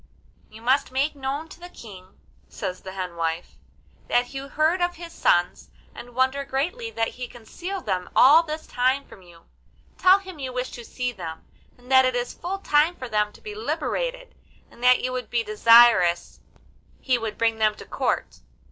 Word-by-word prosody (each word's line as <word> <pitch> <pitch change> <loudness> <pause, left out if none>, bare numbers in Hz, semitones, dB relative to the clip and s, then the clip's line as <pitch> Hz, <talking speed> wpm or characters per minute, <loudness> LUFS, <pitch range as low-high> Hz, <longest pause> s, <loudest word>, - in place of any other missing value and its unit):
'You 220 +1 -14
must 260 +3 +2
make 275 +4 0
known 280 +3 -4
to - - -13
the 355 +1 -10
King,' 190 - -13 0.3
says 185 -2 -5
the 190 -1 -9
hen 185 -2 -5
wife, 165 +1 -3 0.5
'that 245 +2 +1
you 270 0 -6
heard 315 +5 +1
of 350 0 0
his 335 0 -10
sons, 175 0 +1 0.2
and 240 0 -11
wonder 260 +2 +1
greatly 345 - -2
that 225 - -1
he 250 0 -7
concealed 350 - -7
them 185 -3 -2
all 295 +6 +8
this 315 -1 -6
time 260 +3 0
from 190 - -15
you; 170 -2 -18 0.5
tell 370 +1 +7
him 375 -5 -11
you 260 -2 -4
wish 250 0 -3
to 240 - -9
see 250 +2 -3
them, 165 -7 -8 0.3
and 250 +1 -15
that 260 0 +7
it 255 -1 0
is 245 0 -2
full 370 +3 -4
time 315 -2 +2
for 255 - -7
them 210 -1 +1
to - - -17
be 425 - -7
liberated, - - -3 0.4
and 240 - -15
that 250 0 +5
you 255 - -1
would 255 -1 -4
be 235 -1 0
desirous 215 -5 +5 0.6
he 255 -2 +1
would 220 -2 -5
bring 225 -1 +1
them 215 -1 +3
to - - -11
the - - -22
Court. - - -2
255 Hz, 190 wpm, -24 LUFS, 220-310 Hz, 0.6 s, all